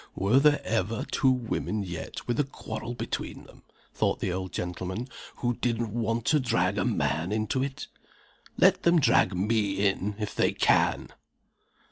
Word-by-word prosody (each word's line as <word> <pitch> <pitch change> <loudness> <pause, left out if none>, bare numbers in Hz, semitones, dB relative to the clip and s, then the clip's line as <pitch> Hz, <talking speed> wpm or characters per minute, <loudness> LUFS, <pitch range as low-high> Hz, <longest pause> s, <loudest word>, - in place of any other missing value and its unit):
"Were 100 +8 +3
there 150 0 +4
ever 110 0 -1
two 135 - +3
women 115 -4 -1
yet 85 -3 -6
with 120 +1 -1
a - - +4
quarrel 120 -3 -6
between - - -5
them," - - -17 0.3
thought - - 0
the 90 - -1
old 95 0 -4
gentleman, 90 +6 -4 0.3
"who 120 -1 -1
didn't 115 -3 -1
want 115 0 -1
to 155 - +3
drag 100 -6 +1
a - - +1
man 85 +5 0
into 110 +4 0
it? 135 0 -4 0.7
Let - - +5
them 170 0 +4
drag 95 -9 +3
me 100 0 +1
in, 100 +1 -1
if 105 -2 -4
they - - +2
can!" - - +2
110 Hz, 160 wpm, -27 LUFS, 95-120 Hz, 0.7 s, Let